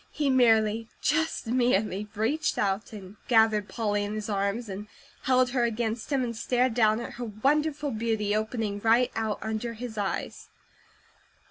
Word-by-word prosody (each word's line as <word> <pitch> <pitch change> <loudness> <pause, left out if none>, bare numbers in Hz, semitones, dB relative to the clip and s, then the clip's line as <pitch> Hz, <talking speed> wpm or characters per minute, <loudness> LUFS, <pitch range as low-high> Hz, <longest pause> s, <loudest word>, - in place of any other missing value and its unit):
He 290 -3 0
merely, 225 -3 +3
just 320 0 0
merely, 215 -4 +1
reached 245 +10 0
out 195 +1 -1
and 200 -1 -10
gathered 220 -3 +3
Polly 205 -3 -1
in 205 +1 -4
his 215 +1 -4
arms, 200 +4 -1
and 200 +1 -6 0.4
held 255 -1 +3
her 250 -2 +1
against 230 +1 -2
him, 270 -2 +2
and 235 -1 -3
stared 250 +2 +1
down 220 -1 +3
at 235 - -6
her - - -2
wonderful 285 +6 0
beauty 220 -2 -1
opening 215 -1 -2
right 230 +3 +3
out 220 -2 -1
under 220 +2 -3
his 225 -1 -6
eyes. 200 -2 -4
225 Hz, 155 wpm, -27 LUFS, 210-245 Hz, 0.4 s, merely